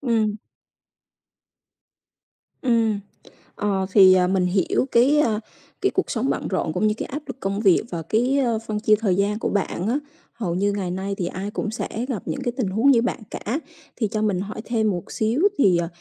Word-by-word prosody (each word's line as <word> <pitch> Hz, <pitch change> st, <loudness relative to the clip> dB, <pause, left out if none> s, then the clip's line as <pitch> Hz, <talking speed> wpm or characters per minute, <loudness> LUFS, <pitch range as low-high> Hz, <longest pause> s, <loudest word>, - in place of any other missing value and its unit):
Ừm. 225 Hz, -5 st, +1 dB, 2.3 s
Ừm, 230 Hz, -4 st, +2 dB, 0.6 s
ờ 195 Hz, -2 st, 0 dB
thì, 190 Hz, -2 st, +8 dB
ờ, 180 Hz, -1 st, +4 dB
mình 185 Hz, -1 st, +1 dB
hiểu 180 Hz, +6 st, +1 dB
cái 270 Hz, +6 st, +4 dB
ơ, 220 Hz, -8 st, +2 dB, 0.4 s
cái 390 Hz, -, +3 dB
cuộc 380 Hz, -, 0 dB
sống 255 Hz, +2 st, -1 dB
bận -, -, -1 dB
rộn 185 Hz, -4 st, -1 dB
cũng 215 Hz, -, +1 dB
như 210 Hz, -, +2 dB
cái -, -, -3 dB
áp 290 Hz, +4 st, -5 dB
lực 265 Hz, -2 st, -7 dB
công 195 Hz, -1 st, -2 dB
việc 195 Hz, -5 st, +4 dB
và 170 Hz, -2 st, -4 dB
cái, 240 Hz, -, +1 dB
ơ, 235 Hz, -5 st, +1 dB
phân 210 Hz, -1 st, -2 dB
chia 215 Hz, 0 st, +4 dB
thời 200 Hz, -5 st, +1 dB
gian 200 Hz, +2 st, 0 dB
của -, -, -1 dB
bạn 195 Hz, -1 st, -1 dB
á, 260 Hz, +5 st, +1 dB, 0.3 s
hầu 200 Hz, -8 st, -3 dB
như 200 Hz, +3 st, +1 dB
ngày 190 Hz, -3 st, -2 dB
nay 190 Hz, +2 st, -3 dB
thì 180 Hz, -, -2 dB
ai 195 Hz, +3 st, -5 dB
cũng 215 Hz, -, -3 dB
sẽ 225 Hz, -, -3 dB, 0.2 s
gặp 215 Hz, -8 st, -3 dB
những 275 Hz, -, -3 dB
cái 245 Hz, -, 0 dB
tình 245 Hz, -6 st, 0 dB
huống 220 Hz, +9 st, +3 dB
như 235 Hz, -4 st, +4 dB
bạn 245 Hz, -, -1 dB
cả. 250 Hz, +9 st, -3 dB, 0.4 s
Thì 220 Hz, -, 0 dB
cho 215 Hz, -2 st, -1 dB
mình 205 Hz, -4 st, +1 dB
hỏi 210 Hz, +3 st, -5 dB
thêm 220 Hz, -2 st, +1 dB
một 175 Hz, -3 st, -5 dB
xíu 225 Hz, +7 st, 0 dB, 0.2 s
thì 190 Hz, -11 st, +4 dB
ờ, 170 Hz, -1 st, -1 dB
215 Hz, 210 wpm, -23 LUFS, 190-235 Hz, 2.3 s, thì